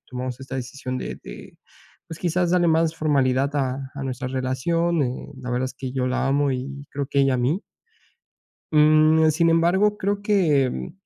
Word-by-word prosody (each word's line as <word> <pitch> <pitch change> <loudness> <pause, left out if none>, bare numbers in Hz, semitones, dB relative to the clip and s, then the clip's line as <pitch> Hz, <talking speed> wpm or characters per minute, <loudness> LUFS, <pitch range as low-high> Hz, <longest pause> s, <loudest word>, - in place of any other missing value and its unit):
Tomamos 125 0 -5
esta 135 0 -8
decisión 130 0 -5
de - - -5
de, - - -11 0.5
pues, 160 - -8
quizás 175 0 0
darle 175 -1 +3
más 160 0 +2
formalidad 140 -2 +1
a 135 0 -2
a 140 - -6
nuestra 130 -1 -4
relación. 140 +6 0
Eh, 130 +3 -4
la 130 -1 -7
verdad 125 +1 0
es 130 - -8
que 130 -1 -6
yo 130 -1 -1
la 130 - 0
amo 140 +1 +2
y 140 +2 -6
creo 140 -1 -3
que 140 0 +1
ella 135 -1 +3
a - - +1
mí. 140 - 0 1.1
Mm. 155 +1 +5
Sin 165 +2 +2
embargo, 185 +6 +3
creo 200 +1 -1
que, 145 - +1
140 Hz, 180 wpm, -23 LUFS, 130-165 Hz, 1.1 s, Mm